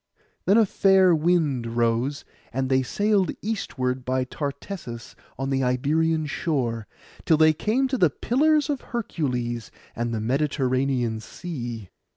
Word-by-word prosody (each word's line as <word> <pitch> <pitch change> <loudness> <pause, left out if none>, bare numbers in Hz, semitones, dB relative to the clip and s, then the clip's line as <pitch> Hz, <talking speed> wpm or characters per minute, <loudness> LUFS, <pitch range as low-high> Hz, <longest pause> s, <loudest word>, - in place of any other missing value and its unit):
Then 195 +4 +5
a 225 - +6
fair 190 -2 +4
wind 150 -8 +1
rose, 120 +4 0 0.3
and 130 +1 -1
they 130 0 +3
sailed 205 - +1
eastward 130 - -2
by 130 +1 0
Tartessus 140 - -6 0.2
on 135 +1 -2
the 135 0 +1
Iberian 155 +5 +1
shore, 125 -8 -2 0.4
till 160 - +4
they 155 0 +6
came 230 - +1
to 260 -2 -1
the 175 - +5
Pillars 295 - +2
of 285 -3 -2
Hercules, 125 - -3 0.3
and 120 0 -2
the 115 - -2
Mediterranean 130 -2 0
Sea. 120 - -7
140 Hz, 135 wpm, -25 LUFS, 125-180 Hz, 0.4 s, a